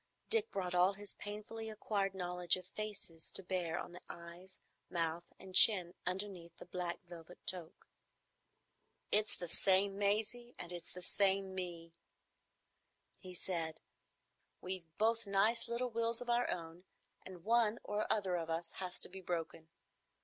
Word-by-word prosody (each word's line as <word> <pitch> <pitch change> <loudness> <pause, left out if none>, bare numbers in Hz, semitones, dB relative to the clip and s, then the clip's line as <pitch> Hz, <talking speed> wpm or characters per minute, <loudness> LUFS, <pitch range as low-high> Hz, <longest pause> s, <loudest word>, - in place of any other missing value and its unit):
Dick 450 -1 +4
brought 180 -2 -2
all 180 +2 +5
his 205 0 -6
painfully 220 +2 -6
acquired 200 -2 -1
knowledge 180 -1 +1
of 185 - -9
faces 185 -5 -4
to 195 - 0
bear 175 -3 -1
on - - -5
the 180 - -10
eyes, 170 +2 -10 0.3
mouth, 170 0 -1
and 190 0 -11
chin 185 -3 +8
underneath 180 -3 -4
the - - -10
black 180 +1 -3
velvet 175 0 -11
toque. 175 -3 -2 1.3
"It's 210 +1 +2
the 175 - -4
same 195 +3 +4
Maisie, 220 +4 0
and 175 - -6
it's 175 -1 -7
the 180 - -7
same 195 0 +3
me," 170 -3 -5 1.3
he 185 -2 -9
said. 165 -3 -3 0.8
"We've 185 -2 -3
both 225 0 +2
nice 215 +5 +3
little 240 +1 -1
wills 230 0 +1
of 245 -1 -2
our 240 +1 +3
own, 165 0 -4 0.4
and 180 -3 -10
one 230 0 +3
or 210 +1 -1
other 195 -4 +1
of 165 -1 -3
us 165 +1 -2
has 180 -1 -3
to - - +7
be 190 +1 -9
broken. 165 -2 -3
185 Hz, 150 wpm, -37 LUFS, 175-210 Hz, 1.3 s, chin